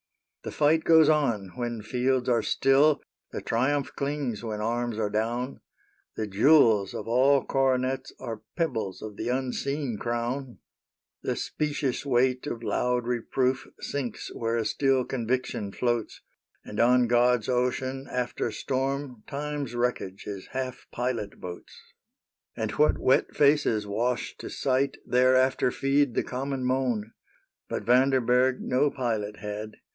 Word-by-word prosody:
The -, -, -5 dB
fight 155 Hz, +2 st, +3 dB
goes 160 Hz, -2 st, +6 dB
on 125 Hz, -11 st, +2 dB
when 120 Hz, 0 st, -4 dB
fields 125 Hz, +3 st, 0 dB
are 120 Hz, -2 st, +3 dB
still, 140 Hz, +6 st, +3 dB, 0.3 s
The -, -, -5 dB
triumph 135 Hz, +4 st, 0 dB
clings 140 Hz, -6 st, -2 dB
when 110 Hz, -2 st, -4 dB
arms 120 Hz, +1 st, -1 dB
are 105 Hz, -2 st, -1 dB
down; 120 Hz, +5 st, -2 dB, 0.5 s
The 110 Hz, -, -2 dB
jewels 105 Hz, -1 st, +4 dB
of -, -, -5 dB
all 130 Hz, +3 st, +4 dB
coronets 130 Hz, 0 st, 0 dB
Are 115 Hz, -4 st, -6 dB, 0.2 s
pebbles 115 Hz, -, -2 dB
of 110 Hz, -1 st, -7 dB
the -, -, -3 dB
unseen 130 Hz, -1 st, -2 dB
crown 120 Hz, +2 st, -3 dB, 0.7 s
j -, -, -3 dB
The -, -, +1 dB
specious 145 Hz, -3 st, -2 dB
weight 130 Hz, -1 st, +1 dB
of 115 Hz, -, -4 dB
loud 125 Hz, +1 st, 0 dB
reproof 125 Hz, +2 st, 0 dB
Sinks 130 Hz, -6 st, -4 dB
where 115 Hz, 0 st, -1 dB
a 115 Hz, -, -1 dB
still 135 Hz, +2 st, +2 dB
conviction 120 Hz, -4 st, -2 dB
floats; 120 Hz, 0 st, -2 dB, 0.4 s
And 105 Hz, -, -6 dB
on 125 Hz, +1 st, +5 dB
God's 120 Hz, -1 st, +3 dB
ocean 130 Hz, +2 st, -1 dB
after 125 Hz, -1 st, -2 dB
storm 135 Hz, 0 st, -3 dB
Time's 145 Hz, -3 st, -4 dB
wreckage 120 Hz, -6 st, -2 dB
is 100 Hz, -2 st, -6 dB
half 130 Hz, -1 st, -4 dB
pilot 120 Hz, -4 st, -3 dB
boats; 90 Hz, -1 st, -9 dB, 0.8 s
And 110 Hz, -1 st, -2 dB
what 150 Hz, +7 st, +3 dB
wet 130 Hz, -, +2 dB
faces 140 Hz, -7 st, +3 dB
wash 115 Hz, +5 st, -1 dB
to -, -, -7 dB
sight 135 Hz, +1 st, 0 dB
Thereafter 130 Hz, +1 st, +3 dB
feed 135 Hz, -1 st, +1 dB
the -, -, +1 dB
common 130 Hz, 0 st, -3 dB
moan; 125 Hz, -4 st, 0 dB, 0.3 s
— -, -, -49 dB
But -, -, -3 dB
Vanderberg 125 Hz, 0 st, +3 dB
no 130 Hz, +3 st, +2 dB
pilot 110 Hz, -6 st, -2 dB
had. 105 Hz, +1 st, -6 dB
125 Hz, 140 wpm, -27 LUFS, 115-135 Hz, 0.8 s, goes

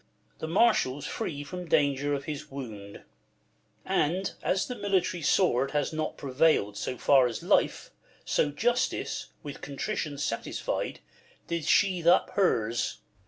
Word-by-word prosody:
The 160 Hz, -, -4 dB
marshal's 160 Hz, -, +2 dB
free 145 Hz, -1 st, -4 dB
from 180 Hz, +4 st, -7 dB
danger 145 Hz, -2 st, +2 dB
of 140 Hz, -, -5 dB
his 150 Hz, 0 st, -6 dB
wound; 110 Hz, -7 st, -8 dB, 0.8 s
And 180 Hz, +6 st, 0 dB
as 190 Hz, +1 st, +1 dB
the 250 Hz, -, -4 dB
military 190 Hz, -4 st, 0 dB
sword 135 Hz, -5 st, +3 dB
has 145 Hz, -, -1 dB
not 155 Hz, 0 st, -3 dB
Prevail'd 135 Hz, -6 st, +2 dB
so 125 Hz, -, -4 dB
far 135 Hz, -1 st, +5 dB
as 115 Hz, -, -5 dB
life, -, -, +1 dB, 0.3 s
so 150 Hz, -, +2 dB
Justice, 240 Hz, -, -1 dB, 0.2 s
with 145 Hz, -2 st, -8 dB
Contrition 145 Hz, +1 st, -3 dB
satisfied, 115 Hz, -5 st, -3 dB, 0.4 s
did 170 Hz, -3 st, -3 dB
sheathe 185 Hz, -4 st, +3 dB
up 175 Hz, -, +5 dB
hers. 115 Hz, -, +1 dB
150 Hz, 130 wpm, -28 LUFS, 135-180 Hz, 0.8 s, far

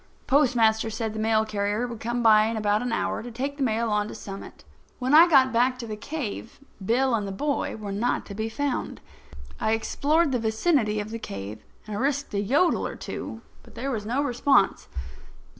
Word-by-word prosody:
The -, -, -33 dB
postmaster 230 Hz, -6 st, +3 dB
said 220 Hz, 0 st, -3 dB
the 220 Hz, -, -5 dB
mail 220 Hz, 0 st, +2 dB
carrier 210 Hz, +2 st, -1 dB
would 235 Hz, -2 st, -7 dB
come 240 Hz, +1 st, -2 dB
by 215 Hz, -1 st, +6 dB
in 225 Hz, 0 st, -2 dB
an 215 Hz, -, -4 dB, 0.3 s
hour -, -, -1 dB
to 245 Hz, -, -7 dB
take 270 Hz, +5 st, -4 dB
the -, -, -6 dB
mail 230 Hz, -2 st, +1 dB
on 210 Hz, 0 st, +1 dB
to -, -, -8 dB
Summit. 195 Hz, -1 st, -9 dB, 0.3 s
When 255 Hz, +2 st, -1 dB
I 325 Hz, +3 st, +9 dB
got 265 Hz, -4 st, +5 dB
back 250 Hz, +2 st, +2 dB
to 245 Hz, -, -6 dB
the 215 Hz, -2 st, -5 dB
cave 235 Hz, -2 st, -6 dB, 0.2 s
Bill 250 Hz, +5 st, +2 dB
and 210 Hz, -3 st, 0 dB
the -, -, -4 dB
boy 285 Hz, +9 st, -2 dB
were 210 Hz, -2 st, -6 dB
not 215 Hz, +5 st, -1 dB
to 200 Hz, -, -8 dB
be 220 Hz, +2 st, -3 dB
found. 280 Hz, +3 st, -3 dB, 0.6 s
I 220 Hz, -, +1 dB
explored 290 Hz, +7 st, +1 dB
the 250 Hz, -, +1 dB
vicinity 220 Hz, 0 st, +1 dB
of 210 Hz, +1 st, -5 dB
the 230 Hz, -, -4 dB
cave, 100 Hz, -, -7 dB, 0.2 s
and 210 Hz, -1 st, -4 dB
risked 285 Hz, 0 st, -1 dB
a 200 Hz, -, 0 dB
yodel 280 Hz, -, +2 dB
or -, -, -7 dB
two, -, -, -6 dB, 0.2 s
but -, -, -18 dB
there 275 Hz, -, -3 dB
was 220 Hz, -5 st, -3 dB
no 245 Hz, +7 st, 0 dB
response. 250 Hz, -5 st, +2 dB
230 Hz, 205 wpm, -26 LUFS, 215-265 Hz, 0.6 s, I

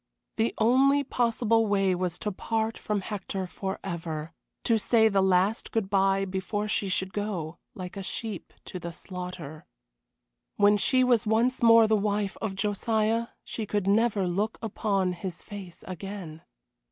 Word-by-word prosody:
The 225 Hz, +1 st, +1 dB
only 270 Hz, +5 st, +4 dB
possible 230 Hz, -3 st, +2 dB
way 195 Hz, -2 st, +2 dB
was 180 Hz, -1 st, -1 dB
to 210 Hz, -, -3 dB
part 220 Hz, +3 st, -1 dB
from 210 Hz, -2 st, -2 dB
Hector 195 Hz, -1 st, -4 dB
forever 170 Hz, -4 st, -5 dB, 0.3 s
to 230 Hz, -2 st, +3 dB
say 220 Hz, 0 st, +4 dB
the 195 Hz, -2 st, +2 dB
last 190 Hz, +3 st, +2 dB
good 210 Hz, -4 st, -1 dB
bye 195 Hz, 0 st, +3 dB
before 195 Hz, +2 st, -2 dB
she 200 Hz, -2 st, 0 dB
should 190 Hz, 0 st, -1 dB
go, 190 Hz, -6 st, -3 dB, 0.2 s
like 180 Hz, 0 st, -7 dB
a 195 Hz, -, -4 dB
sheep, 205 Hz, 0 st, -5 dB
to 185 Hz, -, -6 dB
the 170 Hz, -1 st, -6 dB
slaughter. 180 Hz, -4 st, -7 dB, 0.9 s
When 205 Hz, 0 st, +5 dB
she 255 Hz, +5 st, +3 dB
was 240 Hz, -4 st, +3 dB
once 235 Hz, +4 st, +2 dB
more 230 Hz, -1 st, +7 dB
the 220 Hz, -, +3 dB
wife 205 Hz, -1 st, 0 dB
of 205 Hz, -3 st, -2 dB
Josiah 220 Hz, +3 st, 0 dB, 0.2 s
she 220 Hz, -2 st, -5 dB
could 205 Hz, -2 st, -1 dB
never 205 Hz, 0 st, +3 dB
look 205 Hz, +5 st, -1 dB
upon 195 Hz, -4 st, 0 dB
his 180 Hz, 0 st, -6 dB
face 195 Hz, -4 st, -9 dB
again. 185 Hz, -3 st, -7 dB
200 Hz, 155 wpm, -28 LUFS, 185-220 Hz, 0.9 s, more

